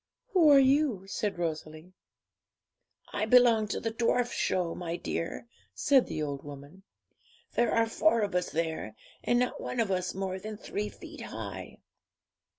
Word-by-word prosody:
'Who 355 -8 +5
are 285 - +8
you?' 270 -7 +3
said 205 0 -2
Rosalie. 160 +1 -5 1.2
'I 215 +1 -1
belong 235 -3 +5
to - - -2
the 225 - -2
Dwarf 240 +1 +1
Show, 180 -3 0
my 170 -1 -4
dear,' 165 +3 -4 0.3
said 275 -3 +4
the 155 - -3
old 140 -2 -4
woman. 145 +5 -11 0.7
'There 240 - +2
are 230 0 +3
four 230 +1 +2
of 200 -2 -1
us 180 0 0
there, 160 -9 -3 0.3
and 240 - +2
not 250 0 0
one 250 - -4
of 220 -4 +1
us 185 -1 -1
more 190 -1 -3
than 215 +2 -7
three 210 0 -4
feet - - -11
high.' - - -7
205 Hz, 155 wpm, -29 LUFS, 170-240 Hz, 1.2 s, are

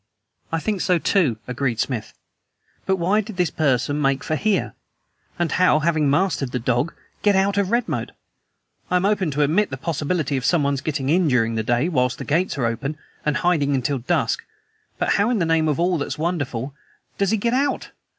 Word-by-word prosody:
"I 165 - +1
think 205 +2 -2
so, 180 - +3
too," 165 - +2
agreed 125 -2 -2
Smith. 120 -5 -3 0.7
"But 190 - +3
why 190 +4 +2
did 215 -2 -9
this 175 -4 +1
person 145 0 +1
make 135 -1 +1
for 155 - -1
here? 205 +4 0 0.6
And 175 -1 0
how, 180 -4 +4
having 155 -2 +1
mastered 145 -4 +1
the - - -1
dog, 125 +6 0 0.3
get 205 -1 +3
out 195 +1 +2
of 200 -2 +1
Redmoat? 240 +1 -1 0.8
I - - +1
am 180 +1 +2
open 200 -4 +1
to 150 +1 +1
admit 180 +9 +2
the 130 - -5
possibility 150 -1 -1
of 130 - -3
someone's 140 -3 +1
getting 140 -3 -2
in 175 +2 +3
during 115 -4 +2
the 110 - 0
day 120 +6 +1
whilst 125 -7 +1
the - - -6
gates 165 +2 0
are 125 - 0
open, 125 +6 -2 0.3
and 150 -1 +1
hiding 150 -6 +2
until 135 +1 -1
dusk. 120 - 0 0.5
But - - 0
how 205 +3 +3
in 245 - +1
the 175 - +1
name 165 -1 +2
of 150 0 0
all 175 -1 +2
that's 145 0 -3
wonderful 145 -6 -2 0.5
does 200 -1 +2
he 220 - +2
GET 235 +3 0
OUT? 280 +2 0
155 Hz, 200 wpm, -22 LUFS, 135-185 Hz, 0.8 s, how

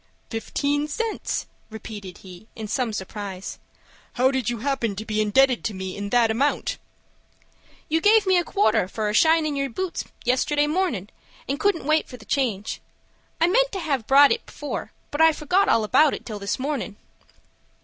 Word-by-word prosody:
"Fifteen 285 +6 -1
cents!" 450 +9 -3 0.2
repeated 210 -4 -8
he, 185 +3 -12
in 220 -1 -6
some 240 +2 -1
surprise. 195 -1 -6 0.5
"How 255 +2 +3
do 265 - 0
you 240 +2 -2
happen 240 -4 -1
to 215 +2 -6
be 215 0 0
indebted 250 +4 +3
to 215 - -2
me 190 0 -5
in 200 0 -5
that 235 0 +3
amount?" 275 +6 0 1.1
"You 320 +1 +1
gave 425 +2 +5
me 375 -1 +4
a - - 0
quarter 210 - +2
for 210 +2 -2
a - - -2
shinin' 315 +3 +3
your 275 0 -1
boots, 370 +8 -4 0.2
yesterday 290 +4 +2
mornin', 295 - -1 0.4
and 275 +2 -2
couldn't 400 -5 +1
wait 310 +1 +2
for 250 - -9
the 220 - -15
change. 225 -6 -1 0.6
I 330 - +5
meant - - +3
to 390 - -2
have 275 -9 -2
brought 280 +1 +7
it 460 - 0
before, 295 - -6 0.2
but 290 - 0
I 320 0 +7
forgot 360 +7 +1
all 225 - +3
about 295 +7 +4
it - - -10
till 215 -3 -6
this 200 0 -2
mornin'." 265 -6 -3
265 Hz, 180 wpm, -24 LUFS, 215-305 Hz, 1.1 s, brought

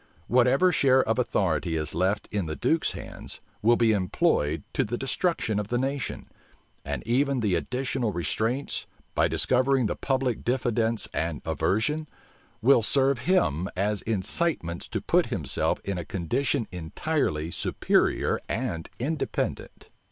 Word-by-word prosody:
Whatever 130 +8 +4
share 130 -4 +4
of 110 +3 0
authority 90 -8 0
is 75 -2 -2
left 95 +4 0
in 100 -5 -1
the 80 - -3
duke's 160 - +1
hands, - - -8 0.2
will 120 +3 +5
be 115 -1 +3
employed 80 -6 +1
to - - +2
the 120 +3 -3
destruction 135 - 0
of 105 - -3
the 120 - 0
nation; 135 +1 -2 0.6
and - - -4
even 135 +3 +2
the 105 -5 +1
additional 125 0 -1
restraints, 110 - -2 0.3
by - - +3
discovering 130 0 +2
the - - -1
public 130 -3 -1
diffidence 115 -2 0
and 80 -2 -2
aversion, 150 +10 0 0.5
will 125 -1 +6
serve 135 +3 +2
him 95 - +2
as 100 +2 0
incitements 100 - -1
to - - -3
put - - +2
himself - - -1
in 100 -2 -3
a - - -4
condition 110 - -1
entirely 85 - -2
superior - - +1
and 80 -1 -3
independent. 150 +5 -3
115 Hz, 135 wpm, -27 LUFS, 95-135 Hz, 0.6 s, will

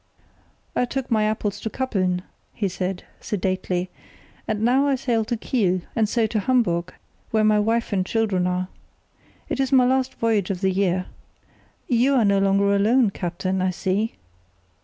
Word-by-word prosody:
"I 250 - +2
took 265 0 -4
my 215 -2 +3
apples 210 -1 -1
to 220 - -4
Kappeln," 185 -8 -1 0.3
he 205 - 0
said, 185 0 -3 0.2
sedately, 185 -2 -2 0.6
"and 215 -1 -1
now 260 +4 +3
I 275 - +2
sail 240 -3 0
to 235 +1 -2
Kiel, 190 -6 0
and 220 -2 +2
so 230 -1 +2
to 215 0 -1
Hamburg, 185 -7 0 0.3
where 220 -1 +2
my 215 0 +4
wife 225 +1 0
and 190 -2 +2
children 190 -3 0
are. 180 0 -1 0.8
It - - -3
is 270 0 0
my 260 -2 +5
last 260 +1 +1
voyage 220 -5 0
of 190 -2 -3
the 190 -1 +2
year. 185 -1 0 0.8
You 255 +3 +3
are 240 -4 +4
no 200 -1 +3
longer 200 +1 +3
alone, 220 +2 +3
captain, 185 +1 -2
I 185 - +2
see." 190 +4 -1
210 Hz, 165 wpm, -23 LUFS, 185-235 Hz, 0.8 s, my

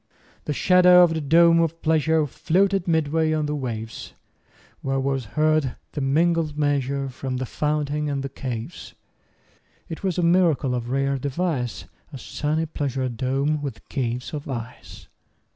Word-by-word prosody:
30 - - -33
The 150 - -1
shadow 180 +3 +6
of 170 -2 +3
the 160 - -2
dome 165 +3 +5
of 165 0 -1
pleasure 160 0 +2
Floated 190 +6 +1
midway 160 -1 +1
on 155 -1 0
the 150 - -2
waves; 115 -5 -5 0.7
Where 135 0 -1
was 135 -2 -1
heard 155 -4 +2 0.2
the 145 - -4
mingled 155 +2 +1
measure 140 -2 0
From 130 0 -5
the 130 - -2
fountain 150 +2 -1
and 140 -1 -2
the - - -2
caves. 125 -4 -7 0.9
It 165 - -6
was 185 -3 -1
a 175 - +1
miracle 170 -6 +3
of 120 -1 -3
rare 135 +1 0
device, 140 -3 -2 0.3
35 - - -26
A - - -5
sunny 150 +5 -2
pleasure 135 -4 -2
dome 135 +5 -1
with 140 -5 -7
caves 125 -1 -3
of 145 -1 -6
ice! 120 -2 -8
145 Hz, 160 wpm, -23 LUFS, 135-160 Hz, 0.9 s, shadow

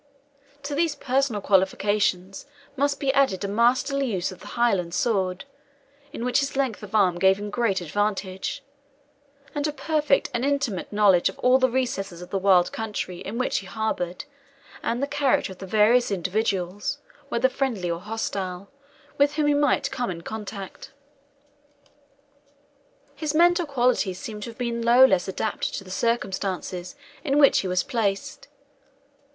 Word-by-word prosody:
To 285 +1 -4
these 315 0 +1
personal 265 -5 0
qualifications 195 +1 +1 0.3
must 280 +1 0
be 270 -2 +1
added 265 -9 +2
a - - -1
masterly 255 +6 +2
use 185 -2 -1
of 185 - -11
the - - -12
Highland 195 -8 +1
sword, 190 -4 0 0.7
in 235 - -5
which 250 +2 +2
his 275 -1 -2
length 265 -5 -1
of 210 0 -7
arm 185 -4 +3
gave 190 +1 +4
him 205 0 -6
great 210 -4 0
advantage 195 - -2 0.9
and 290 0 -1
a - - -1
perfect 300 -1 +1
and 240 - -1
intimate 280 -8 -1
knowledge 205 -4 +4
of - - -10
all 255 +1 +4
the 260 0 +3
recesses 220 -8 -2
of 180 - -10
the 195 - 0
wild 185 -2 +4
country 210 -5 -4
in 215 +4 -6
which 255 - 0
he 195 - -11
harboured, 190 -4 -3 0.6
and 240 +4 -1
the - - +3
character 280 -7 +1
of 185 - -11
the 190 - -7
various 220 +5 +4
individuals, 195 +2 -1 0.3
whether 245 -1 +2
friendly 245 -9 -2
or 170 - -3
hostile, 195 -2 -4 0.5
with 285 +1 +3
whom 305 -1 +1
he 295 - +3
might 290 -1 +2
come 245 -3 -2
in 170 -2 -5
contact. 205 0 -7 2.2
His 310 -1 -3
mental 345 +1 +4
qualities 245 -8 +1
seem 215 -3 -7
to 220 - -5
have 230 - -12
been 235 -1 -2
no 240 +3 +7
less 190 -8 +2
adapted 205 +3 -2
to - - -5
the 185 - -11
circumstances 190 -4 -2 0.3
in 285 -3 +1
which 285 -2 +6
he 190 - -2
was 180 0 +1
placed. 270 +3 -2
220 Hz, 160 wpm, -25 LUFS, 190-265 Hz, 2.2 s, no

